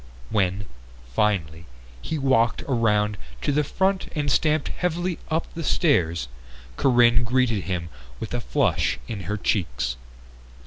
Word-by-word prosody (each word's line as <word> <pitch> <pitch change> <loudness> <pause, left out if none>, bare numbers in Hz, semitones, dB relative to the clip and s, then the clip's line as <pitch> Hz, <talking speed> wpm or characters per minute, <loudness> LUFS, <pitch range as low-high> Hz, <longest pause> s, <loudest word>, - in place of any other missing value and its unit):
When, 100 -1 +1 0.5
finally, 85 - 0 0.3
he 160 - -3
walked 130 -5 +2
around 105 -5 +1 0.2
to - - +1
the 150 +1 +2
front 190 +6 0
and 145 -2 0
stamped 155 +3 +2
heavily 175 0 -2
up 160 +1 0
the 165 - -5
stairs, 85 - +2 0.5
Corinne 120 - +4
greeted 120 -4 +1
him 90 -3 -3 0.3
with - - -5
a - - -1
flush - - +1
in 100 -6 -5
her 105 - -1
cheeks. 60 - -1
115 Hz, 130 wpm, -24 LUFS, 95-145 Hz, 0.5 s, Corinne